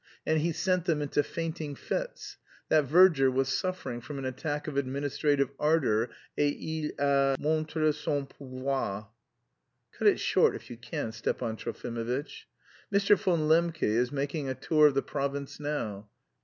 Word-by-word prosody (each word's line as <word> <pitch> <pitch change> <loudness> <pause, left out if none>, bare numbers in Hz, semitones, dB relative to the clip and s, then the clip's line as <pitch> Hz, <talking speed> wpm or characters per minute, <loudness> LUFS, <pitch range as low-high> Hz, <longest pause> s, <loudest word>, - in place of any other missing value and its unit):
And 160 0 +2
he 170 +2 +1
sent 185 +1 0
them 165 -4 +1
into 145 0 +1
fainting 160 -1 -4
fits.... - - -4 0.3
That 155 -2 +4
verger 155 -2 +6
was 135 +1 0
suffering 185 -7 -2
from 145 +4 -7
an 135 - -4
attack 145 +4 -3
of 150 - -4
administrative 140 +1 0
ardour, 135 -8 +2 0.3
et 145 -1 +2
il 160 -1 -3
a 140 -1 +3
montré 155 0 +1
son 145 -1 -2
pouvoir." 130 -6 -4 0.8
"Cut - - 0
it - - +5
short - - +3
if - - -10
you 120 - -7
can, 115 -1 -4
Stepan 110 0 -2
Trofimovitch." 120 +5 -4 0.4
"Mr. 200 0 +5
von 180 -4 +1
Lembke 165 +1 +2
is 120 +4 +2
making 145 0 -2
a 130 - -2
tour 155 +1 +4
of 140 - 0
the 135 - +2
province 140 +1 -3
now. 110 -9 -4
145 Hz, 155 wpm, -29 LUFS, 130-155 Hz, 0.8 s, verger